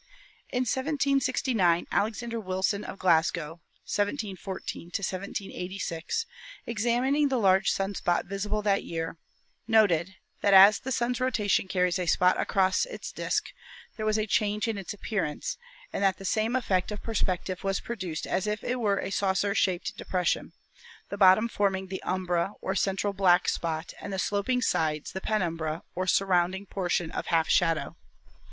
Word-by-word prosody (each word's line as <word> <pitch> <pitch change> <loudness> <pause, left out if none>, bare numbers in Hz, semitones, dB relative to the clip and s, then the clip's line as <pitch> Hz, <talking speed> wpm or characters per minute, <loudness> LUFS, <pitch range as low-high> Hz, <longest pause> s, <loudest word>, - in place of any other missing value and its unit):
In 250 - -1
1769 260 - +1
Alexander 230 +3 -1
Wilson, 190 +1 -1
of - - -7
Glasgow 165 -2 +1 0.2
(1714 200 - -3
1786), 190 - -4 0.4
ex 225 -3 -3
amining 265 +5 +2
the 265 - +1
large 195 -3 +4
sun 195 +1 -1
spot 175 -2 0
visible 205 +2 -2
that 200 -1 +2
year, 165 0 -4 0.5
noted 190 -5 +3 0.3
that, 200 -1 +5
as 200 +2 +9
the 265 - -5
Sun's 245 +1 0
rotation 215 -6 +1
carries 180 -1 +1
a 180 - -2
spot 180 +2 +3
across 190 - +2
its - - -7
disk, - - -2 0.4
there 215 - -4
was 215 0 +2
a 215 - 0
change 210 0 0
in 220 -3 -2
its 190 - -6
appearance, 200 - -3 0.3
and - - -2
that 195 -1 +3
the 195 - -9
same 220 +5 +1
effect 195 -7 0
of 210 - -6
perspective 185 -4 -2
was 195 0 0
produced 185 -9 -5
as 190 - -1
if 210 -1 -2
it 250 +1 -1
were 205 -4 +1
a 195 - -3
saucer 200 0 +1
shaped 185 -3 0
depression, 180 -2 -1 0.6
the - - -4
bottom 195 +3 +6
forming 190 -4 -1
the 190 - -5
umbra 185 0 -1
or 190 - -2
central 195 +1 0
black 185 -3 +4
spot 165 -1 -2
and 200 - -6
the 190 - -3
sloping 205 +6 0
sides 155 -6 0
the 190 - -5
penumbra 165 -7 -1
or 185 +1 -2
surrounding 185 0 +2
portion 175 -4 -1
of - - -4
half 165 -1 +2
shadow. 165 -2 +1
195 Hz, 155 wpm, -28 LUFS, 180-215 Hz, 0.6 s, as